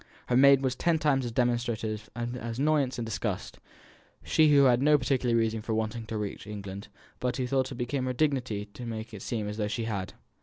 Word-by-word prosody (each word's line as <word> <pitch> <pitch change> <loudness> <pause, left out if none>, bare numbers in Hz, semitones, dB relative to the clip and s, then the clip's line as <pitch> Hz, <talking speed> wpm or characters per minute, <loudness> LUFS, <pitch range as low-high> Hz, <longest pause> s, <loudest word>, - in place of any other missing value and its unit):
Her 125 - +2
maid 135 +1 +6
was 130 -1 0
ten 170 +3 +2
times 145 -4 +1
as 120 - -3
demonstrative 115 -3 -1
of 120 0 -3
annoyance 130 +3 0
and 120 - -3
disgust; 105 -3 -4 0.6
she 155 -1 +4
who 140 -1 +6
had 125 -2 +4
no 150 +1 +5
particular 130 -3 +1
reason 115 -1 +1
for 110 0 -2
wanting 110 +1 -2
to 110 - -3
reach 105 0 -5
England, 100 -1 -7 0.3
but 125 0 -1
who 130 - -1
thought 130 +1 0
it - - -5
became 125 +2 -2
her 130 - -1
dignity 125 -7 0
to 125 - -7
make 110 0 -6
it 105 - -8
seem 110 -2 -3
as 105 +1 -5
though 105 -2 0
she 115 +2 -2
had. 100 -5 -3
120 Hz, 215 wpm, -28 LUFS, 110-130 Hz, 0.6 s, maid